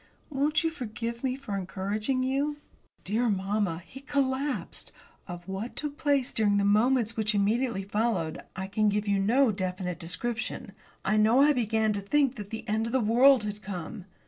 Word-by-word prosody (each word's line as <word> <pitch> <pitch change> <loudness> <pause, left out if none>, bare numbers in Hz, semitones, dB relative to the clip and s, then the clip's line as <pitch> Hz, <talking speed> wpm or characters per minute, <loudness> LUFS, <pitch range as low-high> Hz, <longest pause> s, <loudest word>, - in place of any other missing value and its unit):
Won't 295 +3 +1
you 325 - +1
forgive 235 -3 -5
me 255 -1 0
for 265 -7 -5
encouraging 205 +7 -2
you?" 280 +3 0 0.5
Dear 230 +4 +1
mamma, 195 -3 -1
he 270 - -11
collapsed. 275 0 -2 0.4
Of 175 0 -8
what 195 +5 -5
took 295 -1 -4
place 280 -4 +1
during 205 -2 +2
the 200 - +2
moments 230 +2 +3
which 215 -1 0
immediately 215 +1 +1
followed. 200 -5 -1
I 190 - -3
can 210 +2 +1
give 205 +1 -1
you 200 -1 +2
no 235 +5 +4
definite 185 -2 -3
description. 230 +5 -4 0.3
I 215 +2 +2
know 220 +5 +5
I 295 +1 +5
began 220 -3 +1
to 200 - -3
think 275 +5 +2
that 205 -2 -7
the 225 +1 -7
end 220 +2 0
of 230 - -5
the 260 - +3
world 245 +2 +5
had 210 0 -5
come. 190 0 -6
220 Hz, 175 wpm, -28 LUFS, 200-260 Hz, 0.5 s, know